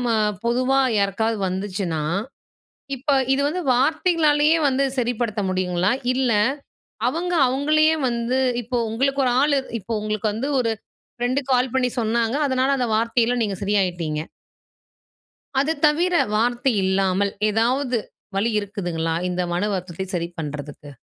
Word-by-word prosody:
அ - - +2 0.3
பொதுவா 255 +3 +2 0.2
யாருக்காவது 210 +2 0
வந்துச்சுன்னா? 185 -4 -3 0.9
இப்ப 270 +3 -3 0.2
இது 280 - 0
வந்து 360 +5 -2
வார்த்தைகளாலயே 310 +2 +3
வந்து 270 +1 +1
சரிப்படுத்த 235 -3 -1
முடியுங்களா? 185 0 0 0.2
இல்ல, 255 -2 +1 0.8
அவங்க, 350 +6 -2
அவுங்களையே 305 +4 +3
வந்து 235 +2 -1 0.2
இப்போ 245 +2 -3
உங்களுக்கு 270 +4 0
ஒரு 245 - +2
ஆளு 285 -1 +3 0.2
இப்போ, 205 +4 -7
உங்களுக்கு 215 0 -1
வந்து 230 +7 -3
ஒரு 230 -2 0 0.4
ஃப்ரெண்டு 245 +3 0
கால் 250 -1 +2
பண்ணி 255 -1 +2
சொன்னாங்க. 230 +2 0
அதனால 260 +1 +1
அந்த 250 - 0
வார்த்தைல 230 +1 +1
நீங்க 200 -3 -2
சரியாயிட்டீங்க! 175 -6 0 1.4
அத 305 +4 +1
தவிர, 340 +5 +2 0.2
வார்த்தை 240 +4 +1
இல்லாமல். 190 +1 +1 0.2
ஏதாவது, 245 +4 +1 0.4
வழி 215 +4 +1
இருக்குதுங்களா? 175 -6 -3
இந்த 180 0 -1
மனவருத்தத்தை 185 -1 -2
சரி 170 -1 -1
பண்றதுக்கு? 145 -1 -7
230 Hz, 125 wpm, -22 LUFS, 195-265 Hz, 1.4 s, வார்த்தைகளாலயே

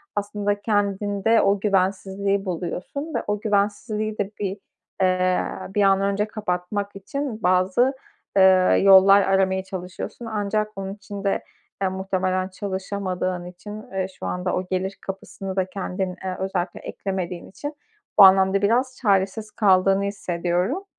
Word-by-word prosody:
aslında 205 0 -1
kendinde 205 +1 +1
o 200 0 +2
güvensizliği 195 0 0
buluyorsun 185 - -4
ve 235 - -1
o 210 0 0
güvensizliği 210 +1 -1
de 205 0 -2
bir, 195 -1 -2 0.5
ııı, 185 +1 0
bir 205 - +2
an 195 0 +4
önce 200 +1 +1
kapatmak 200 -1 -3
için 240 +3 -5
bazı, 185 +9 +3 0.4
ııı, 190 -1 +6
yollar 195 +1 +8
aramaya 190 -1 +2
çalışıyorsun. 185 +5 -7
Ancak 215 -1 -2
bunun 195 0 -4
için 200 0 -8
de, 200 - 0 0.4
eee, 190 - +2
muhtemelen 185 -1 -1
çalışamadığın 190 -2 -3
için, 180 +4 -10
ııı, 190 -6 -3
şu - - -6
anda 180 0 -1
o 185 - -2
gelir 190 +1 -2
kapısını 195 0 -6
da 190 - +1
kendin, 185 -1 -4
ııı, 185 -1 -2
özellikle 190 -2 -2
eklemediğin 185 -3 -5
için 290 +9 -6 0.5
bu - - +12
anlamda 190 +1 +6
biraz 250 +5 +1
çaresiz 205 0 +1
kaldığını 195 -2 +3
hissediyorum. 180 - -1
195 Hz, 135 wpm, -23 LUFS, 185-205 Hz, 0.5 s, bu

